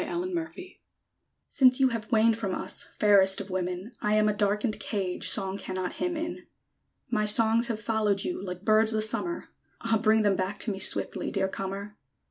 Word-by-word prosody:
A - - -3
CARRIER 360 +2 -4
SONG 365 - -11 0.9
Since 255 -2 +4
you 265 -1 +4
have 230 0 -6
waned 225 0 +4
from 200 -4 -3
us, - - 0 0.2
Fairest 195 -2 +5
of 200 -1 -7
women, 185 +3 -4
I 210 0 +1
am 215 0 +3
a 210 - +2
darkened 210 +2 -1
cage 190 -4 -2
Song 195 -1 0
cannot 185 -1 -4
hymn 350 -2 -1
in. 330 +2 -6 0.6
My 215 -3 +1
songs 225 +2 +4
have 225 -2 -3
followed 210 -2 0
you, 355 - -4
Like 180 0 -7
birds 220 0 +4
the 215 0 0
summer; 340 +10 -2 0.3
Ah! 225 -1 +1
bring 220 0 +3
them 205 -2 +2
back 190 +2 -3
to 220 - -1
me, 195 - -5
Swiftly, 195 - 0
dear 195 -1 -1
comer! 195 +2 -6
215 Hz, 190 wpm, -27 LUFS, 195-230 Hz, 0.9 s, Fairest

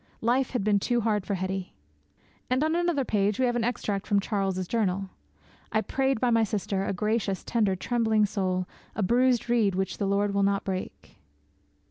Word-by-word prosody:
Life 245 +3 +2
had 245 -6 -2
been 205 -1 +3
too 240 +3 0
hard 210 -3 0
for 200 - 0
Hetty.' 190 0 -4 0.7
And 255 +3 +2
on 315 +1 +1
another 345 -6 +1
page 205 -2 +1
we 260 - +3
have 240 -1 +1
an 240 - 0
extract 210 -4 -2
from 205 - +3
Charles's 195 -3 -1
journal. 195 -3 -1 0.6
'I 215 - +2
prayed 265 +3 0
by 245 0 +2
my 230 -1 +4
sister, 200 -2 -1
a - - -1
gracious, 205 0 -1
tender, 210 -5 +1
trembling 220 +1 +1
soul; 185 -3 -1 0.3
a 215 - 0
bruised 245 +3 +2
reed 225 -5 +2
which 190 -1 -2
the 200 - 0
Lord 200 +1 +1
will 200 - +1
not 200 0 +1
break.' 185 -1 -6
210 Hz, 185 wpm, -27 LUFS, 195-240 Hz, 0.7 s, my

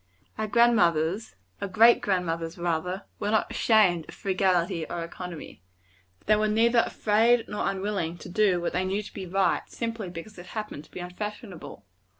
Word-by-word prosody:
Our 220 0 -2
grand 235 +2 +4
mothers 170 - +1 0.3
our - - -1
great 225 +5 +5
grand 185 -3 0
mothers, 165 +1 -3
rather 175 +3 -2 0.2
were 205 - -1
not 220 0 +1
ashamed 185 -8 +3
of - - -10
frugality 185 -4 +1
or 170 -1 -3
economy. 170 - -8 0.6
They 215 - +5
were 215 0 +1
neither 230 +3 +3
afraid 225 +3 +2
nor 210 - -1
unwilling 190 -4 -2
to - - -10
do 190 -1 +2
what 175 - -2
they 180 - 0
knew 195 +3 -1
to - - -11
be 190 -2 -6
right, 190 +1 +1
simply 230 -4 -4
because 180 +4 -9
it 175 - -11
happened 210 -8 -5
to - - -24
be 180 - -7
unfashionable. 180 - -7
190 Hz, 175 wpm, -27 LUFS, 175-215 Hz, 0.6 s, great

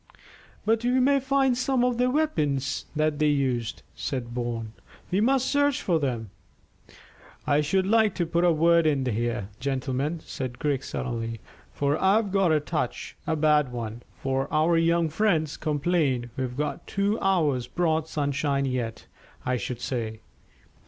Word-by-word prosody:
"But 225 +1 +2
we 250 +2 +2
may 275 +2 +4
find 270 -1 +2
some 255 0 +1
of 245 -1 +1
their 250 0 +3
weapons 150 - 0
that 155 -1 +1
they 150 - +3
used," 130 -6 0
said 125 -5 -4
Bourne. 120 -2 -3 0.4
"We 190 +3 +2
must 260 +3 +3
search 285 -1 +2
for 170 -3 +1
them." 120 -8 -2 1.1
"I 150 0 +3
should 185 +6 +1
like 220 0 +3
to 175 - 0
put 170 +1 0
a 175 - +5
word 165 +1 +4
in 140 -3 +1
here, 115 -4 -1
gentlemen," 135 +4 -2
said 125 -2 -5
Griggs 140 -3 -1
suddenly, 115 -2 -3 0.3
"for 145 +1 0
I've 200 +2 +3
got 195 -3 +3
a 155 - +4
touch 150 - -3
a 160 - +1
bad 150 -3 +3
one 115 -1 -5 0.2
of 135 0 0
our 155 +2 +3
young 165 0 +3
friends' 160 -3 +1
complaint. 145 -5 0
We've 130 -2 -2
a - - -10
good 145 0 -2
two 200 +2 0
hours' 150 -10 +1
broad 160 +2 0
sunshine 140 -2 0
yet, 125 -4 -3 0.4
I 125 0 +1
should 120 +2 -5
say." 115 -4 -3
150 Hz, 160 wpm, -26 LUFS, 130-185 Hz, 1.1 s, a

